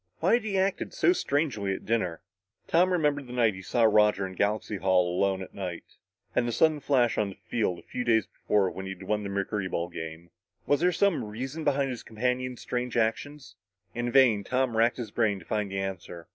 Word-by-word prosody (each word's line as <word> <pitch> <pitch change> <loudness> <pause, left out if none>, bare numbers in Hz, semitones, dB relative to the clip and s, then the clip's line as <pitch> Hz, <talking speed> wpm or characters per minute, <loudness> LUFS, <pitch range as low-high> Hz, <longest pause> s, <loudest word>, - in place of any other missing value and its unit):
Why 175 +7 +3
had 240 -1 +3
he 205 -3 -1
acted 190 - -1
so 360 -7 +4
strangely 140 - -1
at - - -10
dinner? 100 -7 -1 0.5
Tom 180 +3 +3
remembered 145 -6 +1
the 125 - -8
night 115 -4 +3
he 95 - -9
saw 115 +5 0
Roger 105 -2 +4
in 95 - -7
Galaxy 105 +2 -1
Hall 90 -2 +2
alone 95 0 +1
at - - -12
night, 90 -4 -5 0.5
and 120 - +2
the - - -1
sudden 155 +4 +3
flash 130 -4 +2
on 105 -2 +1
the 95 - -9
field 105 -7 -2
a - - -14
few 125 - -4
days 110 -4 +3
before 100 -3 0
when 95 +1 -7
they 95 - -4
had 95 0 -12
won 105 +2 -1
the 100 - -5
mercuryball 95 -3 -2
game. 80 +1 -7 0.3
Was 145 - +2
there 180 +2 +3
some 195 0 +2
reason 130 +9 -5
behind 140 -2 +1
his 120 - -6
companion's 125 +2 -2
strange 125 -1 -3
actions? 130 +5 -2 0.4
In 120 +1 -2
vain, 120 -6 +5
Tom 130 +1 0
racked 115 +2 +3
his 115 -5 -5
brain 110 -3 +1
to 95 - -13
find 105 -2 -1
the 95 - -4
answer. 90 -3 -5
110 Hz, 215 wpm, -28 LUFS, 95-135 Hz, 0.5 s, vain